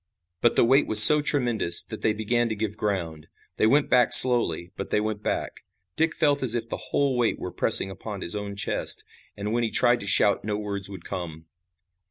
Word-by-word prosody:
But 120 0 0
the - - +2
weight 135 +4 +1
was 110 0 +10
so 150 +7 +9
tremendous 120 - 0
that 110 - -11
they 110 - -1
began 115 +2 -3
to 110 - -5
give 105 0 -5
ground. 85 -8 -6 0.3
They 110 - 0
went 140 +5 0
back 125 -1 +1
slowly, 115 -10 +4
but 100 - -8
they - - -1
went 105 -1 -6
back. - - -6 0.3
Dick 160 0 -2
felt 145 -3 -1
as 120 -3 +2
if 115 -1 -5
the - - -8
whole 140 -2 -2
weight 120 -2 -2
were - - -9
pressing 95 - +1
upon 100 +1 -10
his 85 - -2
own 100 -1 -7
chest, 100 - -3 0.3
and 105 +2 -6
when 120 - -2
he 115 - -3
tried 120 +1 0
to 100 - -8
shout 100 0 +1
no 105 0 -5
words 100 -2 -5
would 95 -4 -13
come. 80 -3 -9
110 Hz, 215 wpm, -23 LUFS, 100-120 Hz, 0.3 s, was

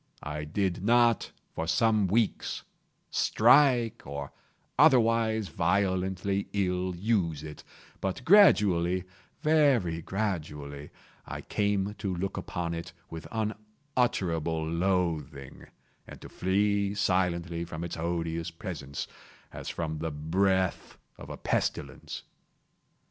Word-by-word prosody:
I 75 0 -4
did 90 +3 -1
not, 120 0 +3 0.2
for 80 - -3
some 105 +4 +3
weeks, 110 +3 0 0.5
strike, 120 -6 +4
or 70 0 -6 0.4
otherwise 115 -6 +4
violently 95 +1 0
ill 90 -2 0
use 85 -6 0
it; 75 -1 -9 0.4
but 95 +6 -3
gradually—very 105 - +3
gradually—I 75 -8 -5
came 100 -1 0
to 95 -3 -2
look 95 +3 -3
upon 85 -3 -3
it 85 +1 -6 0.2
with 80 0 -7
unutterable 105 - -2
loathing, 85 -5 -2 0.4
and - - -10
to - - -10
flee 100 +2 +1
silently 85 -3 0
from 85 -1 -6
its 85 - -4
odious 85 0 -2
presence, 80 -5 -6 0.5
as - - -6
from 80 -2 -3
the 80 +1 -2
breath 95 +5 0 0.2
of - - -10
a - - -6
pestilence. - - -2
95 Hz, 100 wpm, -29 LUFS, 85-105 Hz, 0.5 s, strike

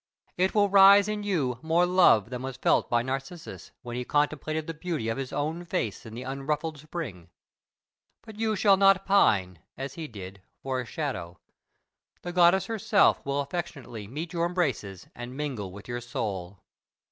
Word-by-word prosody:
It 185 +3 +1
will 205 -1 +5
raise 200 +1 +7
in 210 0 -2
you 150 - -1
more 165 +2 +3
love 175 - +4
than 125 -1 -4
was 130 -1 -5
felt - - +2
by 120 0 +2
Narcissus, 135 +6 -6
when 120 -1 -6
he 125 - -2
contemplated 155 +3 -1
the 165 - -5
beauty 160 -8 -3
of 115 - -2
his 135 -2 -4
own 155 +4 -2
face 115 - -3
in 110 - -9
the 125 - -6
unruffled 145 +4 -3
spring. 140 - -7 0.9
But 220 -2 -12
you 220 -1 +1
shall 200 -1 +4
not 195 0 +4
pine, 95 - +3 0.2
as 135 +1 -5
he 160 -2 -6
did, 95 -4 -10 0.2
for 130 -1 -1
a - - -7
shadow. 115 - -4 0.9
The 175 - -5
goddess 180 +2 +5
herself 210 -1 +2
will 140 +1 -1
affectionately 140 - -6
meet 155 - -6
your 170 0 +1
embraces 130 - -2
and 120 +2 -8
mingle 130 -11 -4
with 100 +2 -11
your 120 0 -4
soul. 100 -6 -5
145 Hz, 170 wpm, -27 LUFS, 120-175 Hz, 0.9 s, raise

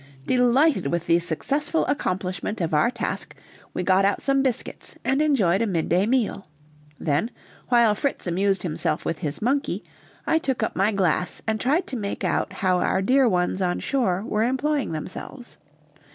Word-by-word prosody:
Delighted 255 - +3
with 170 +3 -1
the 170 0 +4
successful 280 - -1
accomplishment 185 -2 -2
of 165 -3 -2
our 150 +9 +4
task, 240 - -4 0.4
we 180 - -3
got 185 +2 +3
out 200 +1 +2
some 275 0 +2
biscuits 260 -3 -3
and 270 +3 +2
enjoyed 220 - +2
a 230 - +1
midday 180 +1 +1
meal; 235 -7 0 0.5
then, 155 +8 0 0.4
while 235 -3 +5
Fritz 275 +6 -2
amused 195 +3 +1
himself 155 -2 -2
with 165 - -2
his 150 +2 -4
monkey, 275 +5 0 0.4
I 320 - +2
took 265 -7 -1
up - - -2
my 195 +3 +2
glass 180 -3 0
and 220 -1 -1
tried 300 +8 +1
to 255 - -5
make 200 -2 -4
out - - 0
how 185 -1 +1
our 190 - +1
dear 255 +4 +4
ones 180 0 0
on 180 -1 0
shore 200 -9 0
were 210 - 0
employing 270 - 0
themselves. 185 - -7
210 Hz, 165 wpm, -24 LUFS, 180-260 Hz, 0.5 s, while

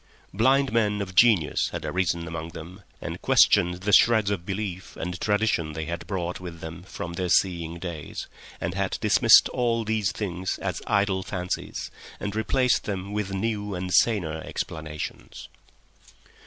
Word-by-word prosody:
Blind 130 +5 +3
men 105 -3 +2
of 95 -2 -4
genius 95 -6 +4
had - - -5
arisen 85 -2 -1
among 80 0 -5
them 90 +5 -10 0.2
and - - -6
questioned 90 +1 +4
the 105 0 0
shreds 110 -3 +5
of 90 -3 -3
belief 95 -2 -4
and 90 +1 -5
tradition 105 -7 +1
they 80 +1 -4
had 85 +1 -5
brought 90 -3 -3
with 85 -2 -8
them 80 +1 -8
from 85 -1 -7
their 90 0 -2
seeing 85 -2 +1
days, 85 -4 -6 0.3
and - - -3
had - - -1
dismissed - - +6
all 120 -2 0
these 110 -2 0
things 95 -3 -3
as 95 -4 -3
idle 100 -2 +2
fancies 90 -2 -4 0.3
and 100 0 -4
replaced 125 +4 +1
them 100 0 -4
with 105 -2 -2
new 105 0 -2
and 90 0 -4
saner 85 -9 +2
explanations. 80 -1 -6
95 Hz, 155 wpm, -26 LUFS, 85-105 Hz, 0.3 s, dismissed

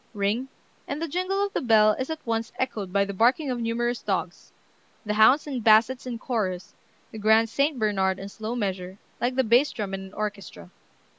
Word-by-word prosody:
Ring, 210 +6 -1 0.4
and 285 - -4
the 330 - -2
jingle 370 +5 -1
of 400 - -7
the - - -1
bell 220 -3 +5
is 260 +6 -3
at 320 0 -6
once 225 -1 -2
echoed 215 -7 -3
by 200 +1 +2
the 200 - -5
barking 255 +7 +2
of 245 - -3
numerous 240 +1 -1
dogs, - - -3 0.5
the 210 - -1
hounds 220 +7 +5
and 265 -6 -4
bassets 225 +4 +4
in 240 -2 -4
chorus, 200 -7 -3 0.4
the 220 - -8
grand 220 +2 +4
Saint 280 +4 0
Bernard 195 -4 +1
in 195 - -7
slow 220 +3 -5
measure, 190 -4 -3 0.2
like 250 +1 -1
the 260 - +3
bass 245 +5 +3
drum 200 -3 -5
in 195 - -4
an 190 0 -11
orchestra. 200 - -6
225 Hz, 200 wpm, -25 LUFS, 200-255 Hz, 0.5 s, bell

